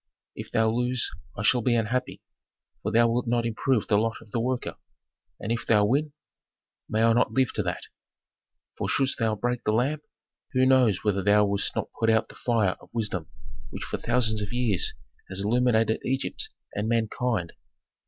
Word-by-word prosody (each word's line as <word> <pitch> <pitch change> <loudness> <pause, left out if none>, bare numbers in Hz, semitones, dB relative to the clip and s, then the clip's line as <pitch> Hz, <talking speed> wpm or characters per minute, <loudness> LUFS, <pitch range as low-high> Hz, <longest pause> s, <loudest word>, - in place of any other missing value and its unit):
If - - -8
thou 110 0 +3
lose 125 +1 0 0.3
I 100 - -3
shall 125 +3 +4
be 120 +1 +2
unhappy, 120 +3 -1 0.6
for - - -2
thou 115 +1 +5
wilt 120 +1 0
not 120 0 +1
improve 115 +1 +1
the 105 -2 +3
lot 115 +1 0
of 105 - -17
the 115 - -1
worker. 125 +1 -2 0.6
And 110 - -4
if 115 - -2
thou 105 -2 +5
win? 145 +6 +1 0.8
May 110 +1 +1
I 115 0 +5
not 120 - +2
live 130 -2 +2
to - - -1
that! 90 -3 -3 0.9
for - - -3
shouldst 135 -1 +1
thou 110 -2 +1
break 120 +3 -2
the 105 - +1
lamp, 135 +7 +1 0.5
who 130 0 +4
knows 125 -7 +4
whether 100 -2 +1
thou 105 +2 +4
wouldst 100 0 -1
not - - -2
put 115 - +2
out 110 0 +2
the - - -12
fire 110 -6 +1
of - - -16
wisdom 105 -8 -2 0.4
which - - -6
for - - -4
thousands 115 -3 +1
of 105 - -4
years 120 -7 +1 0.3
has 95 0 -5
illuminated 115 0 +2
Egypt 135 +1 -2 0.2
and 105 +2 -2
mankind. 115 -4 0
115 Hz, 185 wpm, -26 LUFS, 105-125 Hz, 0.9 s, thou